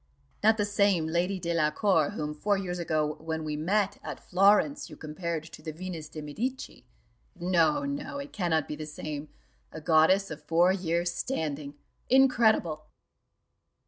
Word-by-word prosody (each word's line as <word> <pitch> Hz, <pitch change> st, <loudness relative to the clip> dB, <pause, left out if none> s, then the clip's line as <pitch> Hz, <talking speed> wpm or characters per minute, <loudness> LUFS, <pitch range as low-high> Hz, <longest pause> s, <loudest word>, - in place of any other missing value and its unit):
Not 220 Hz, +1 st, +5 dB
the 205 Hz, -, +1 dB
same 200 Hz, -5 st, +2 dB
Lady 175 Hz, +4 st, 0 dB
Delacour 165 Hz, 0 st, +2 dB
whom 150 Hz, 0 st, -3 dB
four 200 Hz, +7 st, 0 dB
years 180 Hz, -2 st, -3 dB
ago, 155 Hz, -2 st, 0 dB
when 160 Hz, 0 st, -4 dB
we 155 Hz, -1 st, -3 dB
met 200 Hz, +6 st, 0 dB
at -, -, -6 dB
Florence, 205 Hz, +10 st, +3 dB
you -, -, -11 dB
compared 160 Hz, +1 st, -4 dB
to 160 Hz, -1 st, -12 dB
the 155 Hz, 0 st, -5 dB
Venus 165 Hz, -2 st, -7 dB
de 155 Hz, -, -7 dB
Medici 245 Hz, -, -5 dB, 0.5 s
no, 170 Hz, -, +2 dB
no, 285 Hz, 0 st, -4 dB
it 280 Hz, 0 st, -7 dB
cannot 165 Hz, -6 st, 0 dB
be 150 Hz, -, -4 dB
the 155 Hz, 0 st, -7 dB
same 150 Hz, -1 st, -6 dB, 0.4 s
a 160 Hz, -, -7 dB
goddess 165 Hz, +5 st, +4 dB
of 155 Hz, -1 st, -7 dB
four 170 Hz, +4 st, +4 dB
years' 175 Hz, -2 st, -1 dB
standing! 150 Hz, -, -3 dB, 0.3 s
Incredible!" 220 Hz, -12 st, +3 dB
170 Hz, 150 wpm, -28 LUFS, 155-200 Hz, 0.5 s, Not